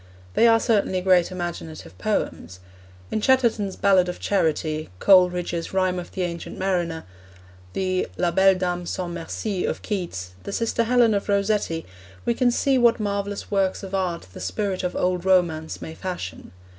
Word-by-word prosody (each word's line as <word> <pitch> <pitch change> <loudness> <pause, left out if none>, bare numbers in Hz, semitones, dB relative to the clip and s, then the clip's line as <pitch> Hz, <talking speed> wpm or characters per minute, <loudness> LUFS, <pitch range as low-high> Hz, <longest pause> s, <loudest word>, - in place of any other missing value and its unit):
They 235 - +5
are 225 0 +5
certainly 205 -5 +1
great 180 -1 +3
imaginative 170 - -6
poems. 90 0 -2 0.5
In 215 - -1
Chatterton's 235 -6 +2
Ballad 190 -3 +3
of 180 - -5
Charity, 155 -4 0
Coleridge's 180 - +3
Rhyme 185 -1 +1
of 175 - -9
the 185 - -2
Ancient 170 -1 -5
Mariner, 175 -4 -1 0.7
the 185 -1 0
La 175 -1 +1
Belle 190 +2 +5
Dame 180 -1 -2
sans 175 -1 -3
Merci 180 +3 -3
of - - -3
Keats, 170 - -4
the - - -6
Sister 230 +2 0
Helen 240 -1 +4
of 200 0 -2
Rossetti, 200 -5 0 0.4
we 235 - +2
can 245 +1 +2
see 265 +2 +2
what 235 -1 +4
marvellous 200 -1 -3
works 195 -1 +1
of 195 0 -8
art 180 -3 -1
the - - -9
spirit 195 -3 -2
of 180 - -2
old 180 -1 0
romance 170 -4 +1
may 160 - -7
fashion. 175 - -6
185 Hz, 160 wpm, -24 LUFS, 175-200 Hz, 0.7 s, They